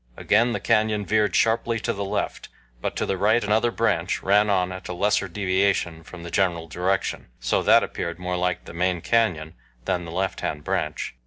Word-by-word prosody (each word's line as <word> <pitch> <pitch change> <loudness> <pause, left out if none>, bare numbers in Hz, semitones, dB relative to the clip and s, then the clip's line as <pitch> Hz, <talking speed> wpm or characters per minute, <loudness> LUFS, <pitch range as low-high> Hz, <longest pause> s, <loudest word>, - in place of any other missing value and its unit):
Again 115 +4 +3
the - - -2
canyon 105 -1 +1
veered 105 -3 +1
sharply 115 0 +2
to 115 - -1
the 100 -1 -4
left, 100 +1 -3 0.3
but - - -3
to - - -1
the 95 - -1
right 110 +3 +3
another 110 +3 +2
branch 95 -7 0
ran 105 +2 +4
on 90 -2 +1
at 95 0 -7
a - - -4
lesser 100 +2 +1
deviation 95 -2 0
from 85 +1 -11
the 85 - -7
general 85 -4 0
direction, 90 +3 -1
so - - +1
that - - +5
appeared 85 0 -4
more 90 0 -3
like 90 0 -1
the - - -10
main 90 0 0
canyon 90 -10 +1 0.3
than 90 -1 -1
the 85 - -8
lefthand 85 -4 -2
branch. 75 0 -2
95 Hz, 190 wpm, -24 LUFS, 85-105 Hz, 0.3 s, that